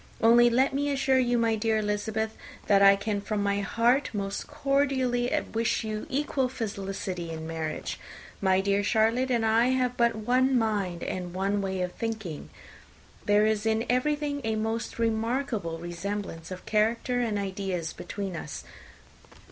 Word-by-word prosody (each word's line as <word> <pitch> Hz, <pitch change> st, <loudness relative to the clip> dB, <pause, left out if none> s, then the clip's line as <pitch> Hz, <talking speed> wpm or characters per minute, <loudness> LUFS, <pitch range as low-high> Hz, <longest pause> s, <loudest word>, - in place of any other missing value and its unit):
Only 235 Hz, +1 st, +6 dB
let 260 Hz, +3 st, +2 dB
me 285 Hz, +1 st, 0 dB
assure 270 Hz, -1 st, +2 dB
you, 245 Hz, -1 st, +2 dB
my 230 Hz, -1 st, +2 dB
dear 220 Hz, 0 st, +1 dB
Miss 210 Hz, 0 st, -1 dB
Elizabeth, 220 Hz, 0 st, -2 dB, 0.3 s
that 200 Hz, -1 st, +4 dB
I 200 Hz, 0 st, +8 dB
can 200 Hz, 0 st, -2 dB
from 205 Hz, 0 st, -2 dB
my 200 Hz, 0 st, +1 dB
heart 235 Hz, +7 st, +2 dB
most 200 Hz, -1 st, -3 dB
cordially 260 Hz, -3 st, +1 dB, 0.2 s
wish 230 Hz, +1 st, 0 dB
you 215 Hz, -1 st, -4 dB
equal 270 Hz, -2 st, 0 dB
felicity 195 Hz, -6 st, -4 dB
in 160 Hz, -1 st, -6 dB
marriage. 160 Hz, -1 st, -4 dB, 0.4 s
My 190 Hz, -1 st, +3 dB
dear 200 Hz, +1 st, +1 dB
Charlotte 225 Hz, +5 st, +2 dB
and 235 Hz, -3 st, +1 dB
I 225 Hz, +2 st, +4 dB
have 255 Hz, -1 st, +1 dB
but 235 Hz, -1 st, +3 dB
one 255 Hz, +4 st, +2 dB
mind 200 Hz, -6 st, -1 dB
and 180 Hz, -1 st, -4 dB
one 200 Hz, +2 st, 0 dB
way 190 Hz, -1 st, -2 dB
of 180 Hz, -, -3 dB
thinking. 220 Hz, -9 st, -5 dB, 0.8 s
There 210 Hz, 0 st, +4 dB
is 215 Hz, -1 st, +1 dB
in 220 Hz, +1 st, +1 dB
everything 290 Hz, +2 st, 0 dB
a 220 Hz, -1 st, 0 dB
most 225 Hz, +2 st, -2 dB
remarkable 225 Hz, -5 st, -1 dB
resemblance 175 Hz, 0 st, -5 dB
of 185 Hz, -1 st, -8 dB
character 230 Hz, +3 st, +1 dB
and 225 Hz, -4 st, 0 dB
ideas 190 Hz, -4 st, -3 dB
between 195 Hz, 0 st, -5 dB
us. 155 Hz, -2 st, -6 dB
220 Hz, 155 wpm, -27 LUFS, 195-245 Hz, 0.8 s, I